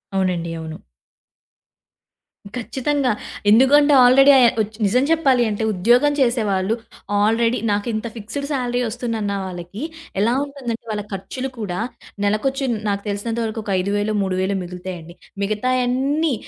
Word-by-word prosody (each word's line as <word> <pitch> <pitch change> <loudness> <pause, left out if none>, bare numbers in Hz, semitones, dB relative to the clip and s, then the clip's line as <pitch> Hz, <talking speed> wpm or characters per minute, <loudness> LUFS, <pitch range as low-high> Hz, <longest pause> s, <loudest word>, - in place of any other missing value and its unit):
అవునండి. 180 -3 0
అవును. 160 0 -8 1.8
ఖచ్చితంగా. 265 +2 -1 0.4
ఎందుకంటే 285 +6 +6
ఆల్రెడీ 270 +3 +7
ఆహ్, 240 -2 +5
ఒచ్ 215 +1 -4
నిజం 250 +6 +3
చెప్పాలి 270 -7 +3
అంటే 210 +1 -2
ఉద్యోగం 240 +10 +3
చేసేవాళ్ళు 220 -5 +1 0.4
ఆల్రెడీ 230 +3 +2
నాకింత 215 +2 -1
ఫిక్స్‌డ్ 230 +6 -5
సాలరీ 250 -3 -1
వస్తుందన్న 220 -3 -3
వాళ్ళకి 185 +5 -7 0.4
ఎలా 230 +3 +3
ఉంటుందంటే, 260 -5 -6
వాళ్ళ 210 -1 -3
ఖర్చులు 255 +8 -5
కూడా 180 -4 -3 0.5
నెలకొచ్చి 265 +7 0 0.2
నాకు 200 0 -1
తెలిసినంత 225 +3 -3
వరకు 220 0 -4
ఒక 205 - -4
ఐదు 200 +2 -1
వేలో, 215 +1 -1
మూడు 190 -1 -1
వేలో 195 +1 0
మిగులుతాయండి. 175 -1 -8 0.3
మిగతావన్నీ 255 +7 0
225 Hz, 125 wpm, -21 LUFS, 200-255 Hz, 1.8 s, ఆల్రెడీ